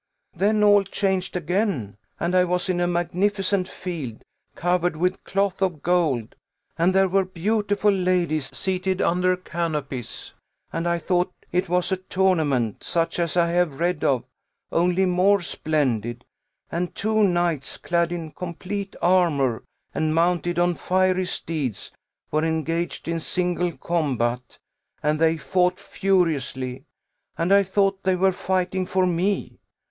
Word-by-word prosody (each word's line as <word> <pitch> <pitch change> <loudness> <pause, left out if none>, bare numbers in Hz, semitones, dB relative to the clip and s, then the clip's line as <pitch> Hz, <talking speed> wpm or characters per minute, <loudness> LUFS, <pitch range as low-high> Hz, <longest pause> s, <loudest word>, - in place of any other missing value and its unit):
Then 210 +4 +2
all 205 -1 +6
changed 190 -1 -1
again, 175 - -1 0.2
and 175 - -1
I 180 - +6
was 180 +1 -1
in 180 -1 +1
a 175 - +2
magnificent 185 +2 0
field, 155 - -6 0.3
covered 175 -1 +1
with 180 +3 0
cloth 195 -1 0
of 175 -6 -1
gold, 155 -10 +1 0.4
and 175 +3 +2
there 195 0 +5
were 195 +1 +2
beautiful 205 +3 +1
ladies 180 -6 +1
seated 185 0 -1
under 180 +1 +2
canopies; 150 -9 -4 0.4
and 165 - -1
I 170 0 +2
thought 180 +1 0 0.2
it 180 0 0
was 180 +2 +1
a 190 - +2
tournament, 160 - 0
such 165 +1 -1
as 170 0 0
I 170 -1 +4
have 170 -5 +1
read 175 -1 0
of, 130 -4 +2 0.5
only 180 +2 +2
more 185 +3 +3
splendid; 125 -8 -1 0.5
and 175 +1 -2
two 220 +1 +1
knights, 175 -7 +1
clad 170 0 0
in 165 -3 -4
complete 185 +4 -5
armour, 160 -10 +3 0.3
and 155 0 0
mounted 175 0 +1
on 175 0 +3
fiery 185 +1 +1
steeds, 150 - -3 0.4
were 155 +1 +1
engaged 165 +2 -2
in 165 0 -1
single 175 0 -1
combat; 125 -7 -1 0.5
and 150 0 +1
they 165 0 +3
fought 180 +3 +1
furiously, 145 -11 -1 0.5
and 170 +4 +2
I 200 - +7
thought 195 0 +1
they 190 -1 +2
were 190 +1 +3
fighting 185 0 -1
for 185 0 +2
me. 180 +3 -1
175 Hz, 140 wpm, -24 LUFS, 160-185 Hz, 0.5 s, I